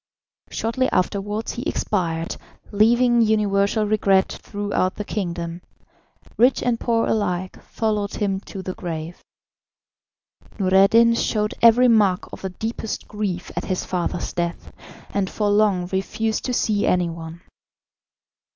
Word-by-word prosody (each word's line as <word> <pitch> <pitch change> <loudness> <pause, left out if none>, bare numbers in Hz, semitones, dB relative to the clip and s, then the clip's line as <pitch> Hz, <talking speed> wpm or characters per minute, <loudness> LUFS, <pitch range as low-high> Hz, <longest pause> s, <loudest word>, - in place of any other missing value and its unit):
Shortly 245 +3 -1
afterwards 205 +3 -1
he 240 - -5
expired, 170 - -2 0.3
leaving 235 +3 +4
universal 210 -1 +2
regret 200 -2 +2
throughout 205 -3 -2
the 210 - -5
kingdom; 170 -4 -4 0.8
rich 250 +3 +4
and 240 -2 0
poor 230 -1 +1
alike 185 -4 -2
followed 210 -3 -2
him 195 -2 -1
to 195 -1 -9
the 185 - -4
grave. 165 -1 -6 1.4
Noureddin 200 +4 +5
showed 210 -2 0
every 235 +2 +7
mark 205 -6 +2
of - - -8
the 190 - -3
deepest 220 +3 -5
grief 200 -4 -4
at - - -3
his 185 -1 -2
father's 175 -1 -2
death, 170 0 -4 0.4
and 195 -2 0
for 210 -1 0
long 205 -4 +3
refused 215 +3 -1
to 250 - -1
see 210 -3 +1
any 180 -2 +2
one. 165 0 -9
205 Hz, 125 wpm, -22 LUFS, 185-220 Hz, 1.4 s, every